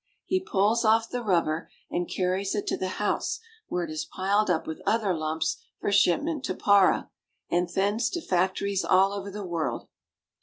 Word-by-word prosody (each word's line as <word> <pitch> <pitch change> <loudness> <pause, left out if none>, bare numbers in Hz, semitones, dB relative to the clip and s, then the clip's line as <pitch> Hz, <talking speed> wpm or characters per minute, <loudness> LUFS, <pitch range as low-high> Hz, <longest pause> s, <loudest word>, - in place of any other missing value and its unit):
He 375 - +1
pulls 220 - +1
off 225 +1 +3
the 245 - -2
rubber 170 -6 0 0.2
and 175 -1 -2
carries 190 +2 -1
it 205 - -2
to - - 0
the 185 - -3
house, 210 - -1 0.3
where 180 - -1
it 165 - -5
is 155 0 -3
piled 200 +2 0
up 165 -3 +1
with 160 - -6
other 220 -4 +1
lumps 160 0 -1 0.2
for - - -1
shipment 270 - +2
to 185 - -2
Para, 200 -2 +3 0.4
and 175 +1 +1
thence 205 +6 +1
to 345 - -3
factories 190 +2 0
all 190 +2 +4
over 200 0 -5
the 200 0 -6
world. 170 -3 -3
195 Hz, 180 wpm, -27 LUFS, 175-210 Hz, 0.4 s, all